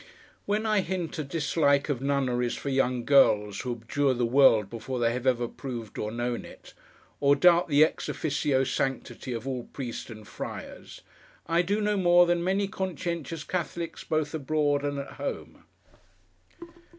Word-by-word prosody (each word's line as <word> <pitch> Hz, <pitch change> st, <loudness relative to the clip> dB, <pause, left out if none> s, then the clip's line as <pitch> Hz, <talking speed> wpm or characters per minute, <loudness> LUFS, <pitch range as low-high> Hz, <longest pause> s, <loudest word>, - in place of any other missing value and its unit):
When 210 Hz, +2 st, 0 dB
I 215 Hz, -2 st, +3 dB
hint 175 Hz, -3 st, -4 dB
a -, -, -1 dB
dislike 145 Hz, -1 st, +1 dB
of 140 Hz, -5 st, -2 dB
nunneries 130 Hz, -3 st, 0 dB
for 140 Hz, -, -5 dB
young 130 Hz, -3 st, 0 dB
girls 105 Hz, -7 st, +4 dB
who 125 Hz, -1 st, -3 dB
abjure 130 Hz, +4 st, 0 dB
the 120 Hz, 0 st, +1 dB
world 115 Hz, -4 st, +5 dB
before 115 Hz, +4 st, -5 dB
they 115 Hz, -1 st, +1 dB
have 125 Hz, +1 st, -3 dB
ever 120 Hz, -2 st, +2 dB
proved 120 Hz, -4 st, -7 dB
or 105 Hz, -, -3 dB
known 120 Hz, +1 st, -2 dB
it; -, -, -14 dB, 0.5 s
or 140 Hz, 0 st, +4 dB
doubt 175 Hz, +3 st, +5 dB
the 150 Hz, -1 st, +5 dB
ex -, -, -5 dB
officio 145 Hz, -3 st, 0 dB
sanctity 130 Hz, 0 st, -3 dB
of 120 Hz, +2 st, -5 dB
all 125 Hz, -3 st, -3 dB
Priests 125 Hz, -4 st, -6 dB
and 110 Hz, -2 st, -10 dB
Friars; -, -, -8 dB, 0.4 s
I 165 Hz, +1 st, +2 dB
do 200 Hz, +4 st, 0 dB
no 210 Hz, 0 st, +1 dB
more 175 Hz, -1 st, +5 dB
than 175 Hz, 0 st, +1 dB
many 195 Hz, +2 st, +1 dB
conscientious 170 Hz, -4 st, -4 dB
Catholics 170 Hz, -1 st, -4 dB
both 155 Hz, -1 st, -1 dB
abroad 145 Hz, -1 st, 0 dB
and 145 Hz, -1 st, -2 dB
at 140 Hz, 0 st, -6 dB
home. -, -, -6 dB
140 Hz, 165 wpm, -27 LUFS, 125-170 Hz, 0.5 s, world